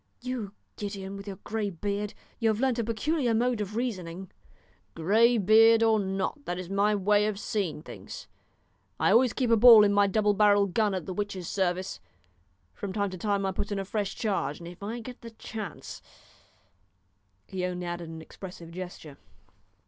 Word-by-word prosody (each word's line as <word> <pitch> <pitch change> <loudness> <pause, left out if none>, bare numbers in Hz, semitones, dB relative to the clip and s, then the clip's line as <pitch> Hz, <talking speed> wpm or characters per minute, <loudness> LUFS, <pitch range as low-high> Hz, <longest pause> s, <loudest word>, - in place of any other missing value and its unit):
"You, 245 -5 -5 0.2
Gideon, 200 -1 -5
with 200 +1 -9
your 195 - -5
grey 215 -1 -2
beard, 200 +3 -3 0.2
you 225 -2 +2
have 215 0 0
learnt 255 -2 +1
a - - +1
peculiar 235 +3 0
mode 240 -1 +1
of 210 +1 -5
reasoning." 190 -7 -4 0.6
"Grey 225 +8 +4
beard 225 +3 +6
or 220 -1 +4
not, 195 +9 -3
that 175 - -3
is 185 0 -7
my 205 +2 +2
way 205 +1 +3
of 215 -2 -2
seeing 185 -9 -2
things. - - -9 0.7
I - - +3
always 245 +1 +5
keep 250 -1 -1
a - - +7
ball 230 -1 +9
in 205 -1 +3
my 205 0 +4
double 210 +1 +2
barrelled 205 -2 +4
gun 210 -3 +2
at 180 -4 -4
the 185 - -4
witch's 195 -3 -4
service; 185 -1 -1 0.7
from 200 -2 -6
time 200 -1 -1
to 185 - -6
time 200 -1 0
I 190 - 0
put 195 +2 -4
in 205 - -1
a 195 - -3
fresh 205 0 -2
charge, 195 -9 -1
and 170 - -10
if 175 +2 -11
I 225 +4 -4
get 250 +2 -10
the 230 - -8
chance 220 -1 -8 0.8
" - - -43
He 190 -2 -5
only 180 -1 -3
added 175 -1 -5
an 160 0 -8
expressive 175 -2 -10
gesture. 175 -5 -8
205 Hz, 185 wpm, -28 LUFS, 185-220 Hz, 0.8 s, ball